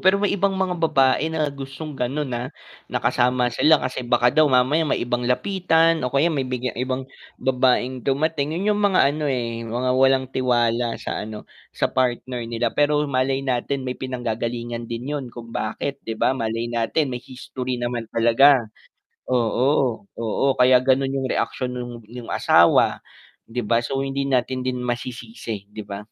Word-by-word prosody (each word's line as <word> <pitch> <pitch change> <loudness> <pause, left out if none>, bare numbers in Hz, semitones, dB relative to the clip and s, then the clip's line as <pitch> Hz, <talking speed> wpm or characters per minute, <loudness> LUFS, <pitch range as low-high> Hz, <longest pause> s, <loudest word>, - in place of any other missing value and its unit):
Pero 190 +2 +4
may 205 0 0
ibang 195 -1 +1
mga 190 -1 0
babae 135 -1 +3
na 160 -1 -1
gustong 140 +3 -7
gano'n, 135 +2 -2
ah, 120 +2 -3 0.4
na - - -1
kasama 125 0 +1
sila 155 +6 +5
kasi 130 - -3
baka 120 0 +2
daw 155 +1 +4
mamaya 130 +5 +3
may - - +1
ibang 120 0 -1
lapitan 165 +1 +2
o 125 - 0
kaya 150 +5 +2
may 135 -4 -2
biglang 125 -1 -2
ibang 130 +1 -2 0.3
babaeng 130 0 +1
dumating. 150 +3 0
'Yun 195 - -2
'yung 210 - -1
mga 200 -2 +3
ano, 150 -1 -2
eh, 115 -3 -2
mga 120 +3 -2
walang 130 0 +3
tiwala 120 -2 +1
sa - - -4
ano, 105 0 -7 0.3
sa - - -1
partner 125 -1 -1
nila. 115 0 -1
Pero 150 0 +2
malay 135 0 0
natin 130 +1 -1
may 125 - -2
pinanggagalingan 120 -2 -4
din 120 +5 -4
'yon, 140 - -3
kung 115 -1 -10
bakit, 140 +6 -3
'di 115 - -5
ba? - - +3
Malay 115 -2 -2
natin 125 +5 0
may 125 0 -5
history 130 0 -5
naman 120 -2 -3
talaga. 120 +5 +5 0.7
Oo, 125 -1 +1
oo, 115 +3 -1
kaya 125 0 +6
gano'n 135 +1 +2
'yung 135 -1 -1
reaksyon 125 -1 -1
nung 120 0 -5 0.2
yung 120 0 -8
asawa, - - +4 0.5
'di 120 +2 -4
ba? 115 +2 +1
So 135 +2 -2
hindi 135 0 -2
natin 130 -1 0
din 125 -1 -2
masisisi, 120 - -5
'di 105 +1 -8
ba? 100 0 -6
130 Hz, 170 wpm, -22 LUFS, 120-140 Hz, 0.7 s, kaya